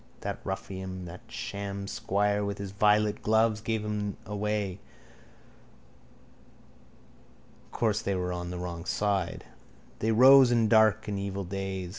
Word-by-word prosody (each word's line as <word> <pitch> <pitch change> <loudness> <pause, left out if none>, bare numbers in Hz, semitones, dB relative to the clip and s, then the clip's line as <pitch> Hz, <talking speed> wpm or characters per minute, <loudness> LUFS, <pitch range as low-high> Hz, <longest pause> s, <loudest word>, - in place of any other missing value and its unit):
That - - -4
ruffian, 95 -1 -5
that 90 +1 -9
sham 100 0 -5
squire, 105 +1 0
with 100 0 -3
his 100 -1 -6
violet 105 +1 +2
gloves 110 0 +2
gave 110 -1 -2
him 105 -1 -3
away. 105 -2 -2 2.9
Course 110 -3 0
they 100 - -1
were 90 -1 -2
on 90 0 -5
the 90 - -5
wrong 85 -1 -5
side. 100 -4 -1 0.5
They 110 - +1
rose 130 +2 +7
in 115 -2 +3
dark 110 -3 +4
and 100 -2 -2
evil 100 0 -3
days. 95 -1 -4
100 Hz, 130 wpm, -28 LUFS, 95-105 Hz, 2.9 s, rose